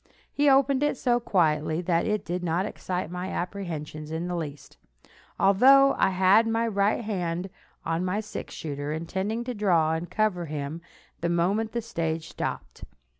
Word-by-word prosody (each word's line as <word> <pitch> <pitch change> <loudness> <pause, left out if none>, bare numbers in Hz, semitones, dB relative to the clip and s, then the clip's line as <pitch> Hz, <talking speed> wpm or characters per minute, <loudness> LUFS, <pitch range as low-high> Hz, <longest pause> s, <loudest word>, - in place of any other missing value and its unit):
He 290 0 +3
opened 275 0 +4
it 295 -2 +1
so 240 -1 +2
quietly 160 -7 +1
that 170 -1 +1
it 210 -2 -1
did 180 +1 -3
not 175 +2 0
excite 180 -5 -4
my 180 +1 -4
apprehensions 165 -6 -5
in 160 +2 -3
the 180 - -2
least, 150 -4 -7 0.6
although 265 +8 +6
I - - +3
had 190 +4 +4
my 225 +1 +1
right 205 +1 +1
hand 180 -3 -3 0.3
on 165 +2 -1
my 185 +3 -1
six 215 -1 -7
shooter, 145 -1 -4
intending 190 +8 -2
to 250 +1 -4
draw 175 -7 +2
and 165 +2 -3
cover 205 -6 0
him 150 +2 -5 0.4
the 170 - -1
moment 195 +6 0
the 235 -1 -2
stage 165 -7 -3
stopped. - - -5
180 Hz, 165 wpm, -26 LUFS, 165-215 Hz, 0.6 s, although